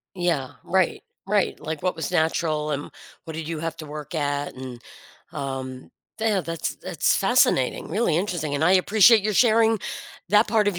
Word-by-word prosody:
Yeah, 170 -8 -1
right 185 -1 +1 0.2
right, 205 0 +1
like, 160 0 -5
what 185 -3 -1
was 160 - -3
natural 160 -2 0
and 145 -1 -3 0.3
what 160 - -7
did 160 0 -5
you 165 -1 -3
have 165 0 -3
to 155 - -7
work 150 +2 -8
at 145 -2 -1
and 130 -1 -8 0.5
um, 130 -1 -6 0.3
they, 220 0 +1
uh, 195 -3 +1
that's 165 -1 -4
that's - - 0
fascinating, - - +2
really 180 -2 +1
interesting, 170 -5 -2
and 145 - -1
I 180 - +5
appreciate 210 +3 +6
your 215 +1 0
sharing 225 0 +4 0.5
that 210 +4 +4
part 210 -1 +3
of 185 -4 -2
165 Hz, 180 wpm, -24 LUFS, 150-205 Hz, 0.5 s, appreciate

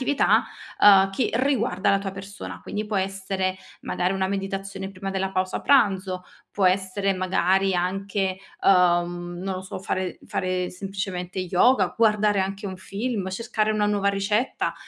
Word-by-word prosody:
un'attività, 280 +2 +3 0.4
uhm, 195 -1 +7
che 230 +5 0
riguarda 240 -7 +1
la 195 - +3
tua 195 -1 -4
persona. 195 0 -8
Quindi 210 +1 -4
può 210 -1 -3
essere 190 -1 -1 0.2
magari 180 +2 -1
una 190 0 0
meditazione 195 0 -4
prima 195 0 -6
della 190 0 -1
pausa 185 -1 -1
pranzo, 190 -8 +2 0.3
può 195 -2 +1
essere 190 +1 +1
magari 185 +1 +1
anche, 190 +1 -1 0.3
uhm, 175 -1 +2
non 190 0 -3
lo 185 - -5
so, 190 - -7
fare 185 -1 -3
fare 185 -1 -1
semplicemente 190 -1 -5
yoga, 185 +9 +3
guardare 210 -2 +3
anche 195 +2 -3
un 190 -1 -5
film, 200 +1 -3
cercare 215 +1 -1
una 210 -1 +1
nuova 200 -1 +1
ricetta, 200 +5 0
195 Hz, 150 wpm, -24 LUFS, 185-200 Hz, 0.4 s, uhm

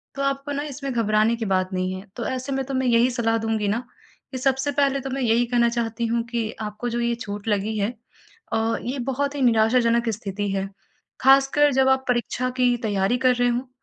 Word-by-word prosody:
तो 275 - -4
आपको 275 +1 -1
न 285 0 -2
इसमें 275 0 -5
घबराने 220 -1 +2
की 225 -1 -4
बात 185 -1 +1
नहीं 185 0 -1
है 185 +1 -7
तो 235 - -4
ऐसे 260 +1 -3
मैं 270 0 -1
तुम्हें 260 -1 -1
यही 235 +2 +4
सलाह 230 -2 +1
दूँगी 220 -2 -1
न 215 +4 +1 0.5
कि 260 - -4
सबसे 270 +2 0
पहले 275 -1 +1
तो 270 - -5
मैं 270 +1 -3
यही 235 0 +3
कहना 235 -1 +2
चाहती 235 0 -2
हूँ 230 +1 0
कि 230 -2 -2
आपको 210 +3 -4
जो 240 0 -2
ये 235 0 +1
चोट 205 -2 -7
लगी 210 +1 0
है 205 +1 0 0.6
अ, 225 +1 +1
ये 255 +3 -4
बहुत 280 +2 -2
ही 280 - -3
निराशाजनक 235 0 +3
स्थिति 205 -1 -3
है 195 0 -2 0.5
खासकर 275 +2 +5
जब 265 0 +3
आप 265 0 +2
परीक्षा 250 +1 0
की 245 -1 +4
तैयारी 205 +2 +1
कर 250 -1 +5
रहे 245 0 +2
हो 245 +2 -2
235 Hz, 215 wpm, -23 LUFS, 220-265 Hz, 0.6 s, खासकर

